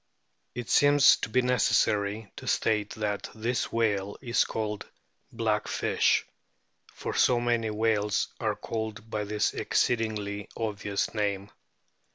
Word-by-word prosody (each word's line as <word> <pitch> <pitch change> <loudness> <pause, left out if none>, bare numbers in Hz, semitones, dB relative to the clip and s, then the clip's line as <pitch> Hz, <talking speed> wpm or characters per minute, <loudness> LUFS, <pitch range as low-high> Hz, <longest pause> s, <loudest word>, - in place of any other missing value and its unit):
It 120 -2 -5
seems 145 -1 +6
to - - -4
be 125 +4 +3
unnecessary 105 -4 +1
to - - -8
state 105 -2 0
that 105 -2 -3
this 115 +3 -2
whale 100 -3 0
is 120 -3 +1
called 105 -2 -4 0.4
"black - - -1
fish," - - +1 0.7
for - - -5
so 125 -1 +3
many 120 -2 0
whales 105 -1 +1
are - - 0
called 110 -1 -5
by 105 -1 -2
this 105 0 0
exceedingly 105 -3 -1
obvious 105 -3 -2
name. 100 -2 -2
110 Hz, 125 wpm, -28 LUFS, 105-115 Hz, 0.7 s, seems